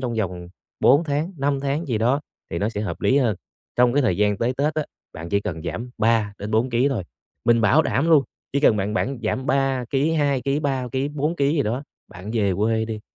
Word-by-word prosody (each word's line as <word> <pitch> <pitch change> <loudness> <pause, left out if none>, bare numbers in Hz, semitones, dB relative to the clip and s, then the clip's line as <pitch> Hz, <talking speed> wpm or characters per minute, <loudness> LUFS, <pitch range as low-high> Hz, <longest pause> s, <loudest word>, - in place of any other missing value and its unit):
trong 120 -3 -2
vòng 90 -5 -3 0.3
4 145 +6 +5
tháng, 150 +5 -1
5 140 0 0
tháng 140 +4 -2
gì 115 -5 -1
đó 125 +6 +2 0.3
thì 85 - -2
nó 105 - 0
sẽ 105 -2 -4
hợp 105 - -4
lý 135 - +3
hơn. 115 -8 +1 0.4
Trong 120 0 +4
cái 145 0 +3
thời 100 -8 +1
gian 105 -1 +1
tới 120 +2 +1
Tết 150 +2 0
á, 155 - -1 0.3
bạn 80 +2 -7
chỉ 100 +2 +1
cần 80 -5 -5
giảm 120 +7 -5
3-4 110 +1 +1
ký 125 +4 +2
thôi, 115 -9 -2 0.4
mình 115 -1 +4
bảo 140 +9 +4
đảm 160 +4 0
luôn, 150 -4 +6 0.3
chỉ 140 - +1
cần 110 -7 +5
bạn 105 +2 -1
bạn 135 +2 -1
giảm 130 +5 -2
3 135 -3 +1
ký, 145 +4 +1
2 145 -4 +1
ký, 140 +4 0
3 135 -4 -1
ký, 135 +2 0
4 150 +3 -2
ký 140 +1 +2
gì 145 - +3
đó, 125 +5 -2 0.3
bạn 90 +4 -9
về 100 -4 +1
quê 110 +2 +1
đi, 110 -1 -5
125 Hz, 235 wpm, -23 LUFS, 110-140 Hz, 0.4 s, luôn